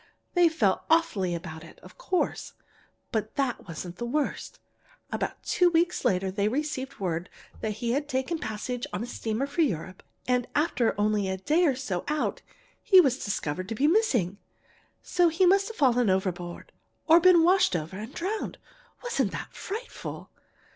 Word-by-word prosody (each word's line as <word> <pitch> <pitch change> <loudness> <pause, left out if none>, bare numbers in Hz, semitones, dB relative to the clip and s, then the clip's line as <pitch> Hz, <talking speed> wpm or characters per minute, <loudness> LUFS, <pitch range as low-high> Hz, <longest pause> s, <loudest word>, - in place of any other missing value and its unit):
They 350 -2 +5
felt 210 -12 +1
awfully 310 - +2
about 165 -2 -7
it, 165 - -14
of - - -14
course, 380 -8 -2 0.6
but 215 -2 -2
that 270 -7 -1
wasn't 175 +1 -7
the 240 - -3
worst. 300 - -2 0.5
About - - -3
two 360 -1 +3
weeks 345 +1 +1
later 190 0 +1
they 200 +1 0
received 270 +1 -3
word 175 -2 -2 0.3
that 215 -1 -2
he 235 +3 -2
had 285 +3 -1
taken 265 +5 -1
passage 235 +2 -4
on 185 - -2
a - - -3
steamer 230 +1 -2
for 285 +5 -1
Europe, 185 - -1 0.3
and 250 -1 +1
after 285 -9 +1
only 210 -2 +1
a 190 - -2
day 310 - +2
or 280 -5 +3
so 215 -9 -3
out 300 0 -1 0.4
he 380 - +7
was 270 -6 +3
discovered 185 -2 -3
to 225 - -3
be 270 - +1
missing, 265 - +2 0.6
so 355 -1 +3
he 340 +4 +2
must 390 +2 +4
have 450 - -8
fallen 245 -5 +3
overboard, 180 -2 -2 0.3
or 330 +1 +7
been 350 -1 +6
washed 365 - +4
over 165 +2 -3
and 220 +7 -8
drowned. 405 +5 -3 0.5
Wasn't 485 -1 0
that - - -6
frightful?" 440 +6 -7
250 Hz, 170 wpm, -27 LUFS, -, 0.6 s, he